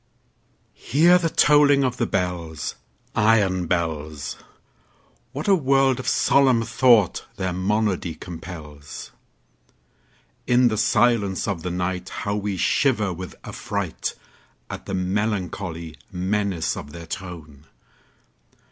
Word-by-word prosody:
Hear 170 +6 +4
the 165 -2 0
tolling 145 -2 +5
of 125 -1 -1
the 120 - 0
bells, 85 -4 -2 0.4
Iron 100 -5 +3
bells! 80 -5 -2 1.0
What 145 +7 -5
a 200 - +6
world 135 -5 +3
of 130 - -6
solemn 130 -4 +4
thought 115 -4 +3
their 95 -2 -2
monody 95 -2 0
compels! 80 -5 -9 1.4
In 125 0 +5
the 110 - -2
silence 110 -4 +2
of 95 -5 -2
the 90 - -3
nightHow 90 +3 -3
we 100 -1 -2
shiver 110 - +2
with 90 +1 -8
affrightAt 100 -5 -4 0.7
the 95 - -3
melancholy 95 -4 -2
menace 95 -1 -1
of 75 +1 -8
their 85 -1 -8
tone! 80 -5 -8
95 Hz, 105 wpm, -23 LUFS, 85-120 Hz, 1.4 s, a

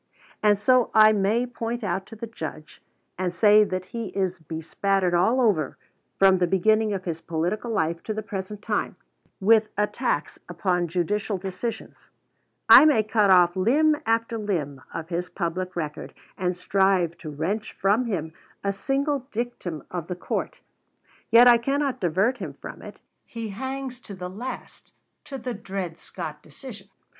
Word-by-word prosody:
And 210 -1 +4
so 250 +4 +3
I 215 0 +8
may 215 +4 +1
point 235 -1 -4
out 190 0 -2
to 225 - -10
the 225 - -6
Judge, 160 -8 -8 0.4
and 185 -1 0
say 210 +4 +6
that 185 -2 -3
he 230 -2 -3
is 190 -2 -1
bespattered 175 +4 -1
all 190 +9 +3
over, 195 - +1 0.4
from 190 -1 +5
the 180 - +2
beginning 215 +4 +2
of 190 -2 -3
his 165 -2 -4
political 175 +9 -2
life 170 -6 0
to 215 - -2
the 215 - -3
present 205 0 -6
time, - - -1 0.4
with 215 +2 +4
attacks 210 - -1
upon 175 0 0
judicial 195 +4 -1
decisions; 190 +5 -6 0.6
I - - +10
may 285 -8 +5
cut 215 -1 +2
off 175 -2 +6
limb 290 +11 +3
after 230 0 0
limb 155 -10 -3
of 165 0 -6
his 180 +1 -3
public 185 +1 -3
record, 155 -3 -5 0.2
and 180 -2 -1
strive 185 -2 +2
to 155 - -7
wrench 175 +9 -3
from 205 +6 +1
him 160 -7 -3 0.3
a 200 0 0
single 275 +4 -1
dictum 215 -9 -4
of 175 -2 -4
the 180 - -3
court, 180 - -4 0.7
yet 235 +2 +8
I 240 -1 +7
cannot 275 +2 -1
divert 195 +9 +1
him - - -5
from - - -10
it. - - -10 0.3
He 230 -2 -6
hangs 260 +3 -5
to 205 -5 -9
the 180 -1 -6
last 245 +7 -8 0.3
to 275 - -6
the 255 -1 -4
Dred 195 -5 -5
Scott 150 -1 -7
decision. 200 - -10
200 Hz, 160 wpm, -25 LUFS, 175-230 Hz, 0.7 s, I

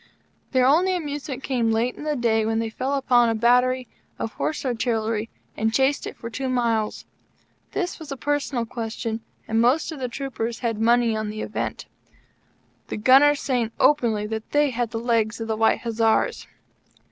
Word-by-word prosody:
Their 255 -2 +3
only 350 +8 +4
amusement 290 -5 -5
came 245 -4 0
late 225 +3 +1
in - - -9
the 300 -1 0
day, 225 -3 +2
when 225 +1 0
they 225 0 -2
fell 265 +5 -2
upon 245 -3 +3
the 225 - 0
battery 250 +2 +3 0.3
of 225 - -4
Horse 310 - -3
Artillery 225 -2 -1 0.3
and 220 +1 0
chased 270 +4 +1
it - - -8
for 230 - -7
two 260 +3 -3
mile's. 230 -4 0 0.7
This 360 -2 -2
was 310 -3 -9
a 275 - -4
personal 275 -2 -1
question, 225 -1 -4 0.3
and 225 +1 +2
most 265 +8 +2
of 310 - -7
the 255 - -2
troopers 235 -3 -4
had 225 -2 -1
money 235 0 +3
on 215 -1 -2
the 215 +1 -5
event; - - -4 1.0
the - - -4
Gunners 270 +6 +5
saying 240 -4 -1
openly 230 -8 +3
that 220 0 -5
they 295 -1 +3
had 240 -1 -1
the 225 - -4
legs 230 -1 0
of 225 - -4
the 220 - -1
White 220 +1 +2
Hussars. 225 -1 +1
235 Hz, 180 wpm, -24 LUFS, 225-270 Hz, 1.0 s, Gunners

